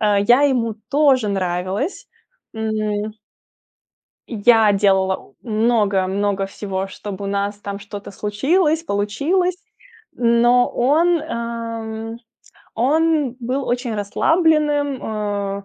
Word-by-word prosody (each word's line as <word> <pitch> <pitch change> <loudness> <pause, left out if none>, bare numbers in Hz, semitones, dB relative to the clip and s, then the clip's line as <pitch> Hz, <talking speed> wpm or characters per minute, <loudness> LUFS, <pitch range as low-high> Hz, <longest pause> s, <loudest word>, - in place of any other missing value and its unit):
э, 205 -2 +3
я 245 +4 +6
ему 245 -6 +1 0.2
тоже 275 -5 +3
нравилась, 190 - -2 0.5
м 215 -1 -2 1.2
Я 225 -1 +4
делала 190 -1 +2
у 135 - -18 0.2
много-много 205 -3 +1
всего, 195 -1 -4
чтобы 200 0 -7
у - - -3
нас 200 +1 -1
там 200 -1 -5
что-то 205 0 -9
случилось, 300 - +1
получилось. 315 - 0 0.6
Но 240 +1 +4
он, 320 +6 +2
ам, 230 -3 -5 0.6
он 295 +1 +1
был 255 +3 -2
очень 245 -1 -2
расслабленным, 295 - +1
а, 205 -2 -3
220 Hz, 100 wpm, -20 LUFS, 200-265 Hz, 1.2 s, я